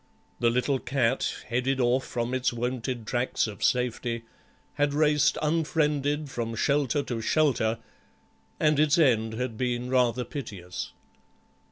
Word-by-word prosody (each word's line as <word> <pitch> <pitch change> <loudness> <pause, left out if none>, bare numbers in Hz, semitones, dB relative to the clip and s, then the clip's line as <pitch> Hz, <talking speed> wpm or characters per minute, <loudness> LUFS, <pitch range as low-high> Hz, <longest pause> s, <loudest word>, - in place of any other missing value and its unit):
The 120 - +3
little 125 +3 +1
cat, 130 -1 0 0.2
headed 125 +3 0
off 125 +1 +2
from 120 +1 -2
its 130 0 +1
wonted 120 0 -3
tracks 120 +3 0
of 105 -3 -6
safety, 120 -1 0 0.5
had 145 0 0
raced 150 -1 +3
unfriended 150 -2 +1
from 115 -3 -4
shelter 140 +3 +1
to 120 -4 -4
shelter, 115 -4 +2 0.8
and 150 -2 +3
its 155 +2 +4
end 115 -8 +3
had 120 -2 -3
been 125 0 -1
rather 125 -1 +2
piteous. 100 - -6
125 Hz, 130 wpm, -27 LUFS, 120-145 Hz, 0.8 s, its